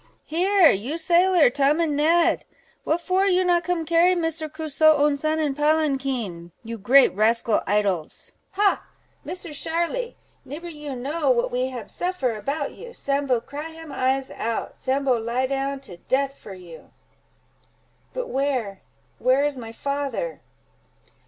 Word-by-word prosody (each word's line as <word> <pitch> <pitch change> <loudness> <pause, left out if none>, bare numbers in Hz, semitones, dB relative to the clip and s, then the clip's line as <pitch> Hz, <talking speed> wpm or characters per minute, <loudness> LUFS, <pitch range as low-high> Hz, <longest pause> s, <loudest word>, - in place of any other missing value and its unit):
Here, 360 +2 +4
you 245 +11 -2
sailor 345 -3 +4
Tom, 285 +4 +2
and 320 -3 +1
Ned, 330 +3 +3 0.4
what 330 +2 0
for 375 +3 +1
you 370 -1 +3
not 350 -1 +3
come 355 -2 -1
carry 340 +3 +4
Misser 325 -2 -2
Crusoe 310 0 +3
own 290 0 +3
son 310 +2 -1
in 300 -3 0
palanquin—you 265 - -1
great 260 +7 +5
rascal 225 +2 +2
idles? 195 -6 -1 0.2
Ha! 400 +1 +2 0.4
Misser 355 -3 -7
Sharly, 340 +11 -2 0.3
nibber 300 +6 -8
you 295 -4 -7
know 285 +4 -1
what 240 -2 +2
we 250 +1 0
hab 250 -3 -8
suffer 355 -10 -2
about 280 +7 -3
you. 475 0 -11
Sambo 275 - 0
cry 295 +5 -7
him 325 -2 -10
eyes 265 0 0
out—Sambo 260 +3 -1
lie 235 +3 -1
down 275 +1 -2
to 190 -10 -11
death 275 +8 -1
for 200 -7 -11
you!" 175 -3 -13 1.2
"But - - -4
where—where 225 - -1
is 290 -1 -1
my 225 -2 -8
father!" 280 - -3
280 Hz, 140 wpm, -24 LUFS, 250-325 Hz, 1.2 s, great